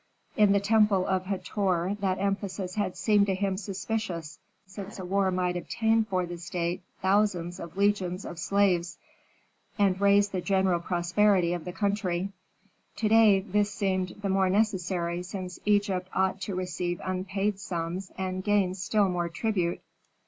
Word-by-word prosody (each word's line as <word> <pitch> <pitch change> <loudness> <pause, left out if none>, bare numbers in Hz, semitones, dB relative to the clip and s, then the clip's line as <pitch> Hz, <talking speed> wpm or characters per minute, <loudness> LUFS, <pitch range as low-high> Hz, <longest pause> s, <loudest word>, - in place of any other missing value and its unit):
In 210 -2 +5
the 200 - +4
temple 205 -2 +3
of 185 -1 -1
Hator 190 -1 -1
that 190 -2 0
emphasis 195 -1 -2
had 195 -3 -2
seemed 205 +1 +3
to 190 - +1
him 195 0 -1
suspicious, 190 -5 -4 0.3
since 195 +2 -9
a 190 - -6
war 195 +1 +1
might 180 -1 0
obtain 225 +5 +1
for 185 -3 -1
the 175 0 -7
state 175 +1 -3 0.2
thousands 190 -3 +1
of 170 +2 -9
legions 200 -2 +1
of 170 - -7
slaves, 180 -2 +1 0.8
and 195 -2 +2
raise 200 0 +5
the 185 -2 -3
general 190 -2 +2
prosperity 175 +1 +2
of 175 -3 -4
the 180 - -4
country. 195 -2 -1 0.7
To 215 0 0
day 215 -3 +6
this 205 +1 0
seemed 190 -4 -1
the 200 - 0
more 190 -1 +2
necessary 185 -4 0
since 180 0 -6
Egypt 200 -3 +1
ought 190 +1 +1
to 200 - -3
receive 180 -1 -3
unpaid 190 +2 -2
sums 175 +1 -4
and 185 0 -3
gain 205 -3 +2
still 200 +2 +1
more 175 -2 -1
tribute. 180 -1 -1
190 Hz, 155 wpm, -28 LUFS, 180-200 Hz, 0.8 s, day